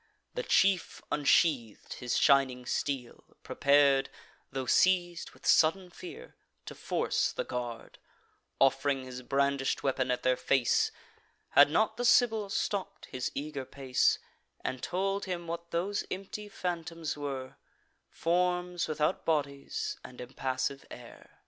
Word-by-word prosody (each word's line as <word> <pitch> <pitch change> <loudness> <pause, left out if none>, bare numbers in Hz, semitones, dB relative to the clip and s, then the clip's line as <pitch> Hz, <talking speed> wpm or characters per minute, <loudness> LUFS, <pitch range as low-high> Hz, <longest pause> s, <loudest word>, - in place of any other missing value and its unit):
The - - -2
chief 190 - +2
unsheath'd 140 -6 +2
his 125 -1 -1
shining 130 -2 +3
steel, 130 -2 -3 0.2
prepar'd, 140 -1 +3 0.4
Tho' 135 -1 -3
seiz'd 175 +4 +2
with - - -18
sudden 175 +3 +3
fear, 180 - -10 0.3
to - - -7
force - - 0
the - - -3
guard, 120 -2 -6 0.6
Off'ring 135 0 +2
his 125 -1 -8
brandish'd 140 +1 0
weapon 130 -1 0
at 125 - -1
their 130 0 +3
face; 125 -1 +2 0.6
Had 145 +1 +7
not 220 +7 +1
the 245 - -1
Sibyl 225 -4 +4
stopp'd 200 -1 -3
his 130 -1 -3
eager 140 -1 -4
pace, 130 -1 +1 0.4
And 130 -1 -4
told 195 +5 -1
him 180 -2 -4
what 170 0 -6
those 190 +5 -1
empty 195 +2 -6
phantoms 165 -4 -4
were: 135 -3 -5 0.5
Forms 180 0 0
without 155 +3 0
bodies, 140 -3 -2
and 125 - -11
impassive 130 +2 -3
air. - - -13
145 Hz, 125 wpm, -30 LUFS, 130-180 Hz, 0.6 s, Had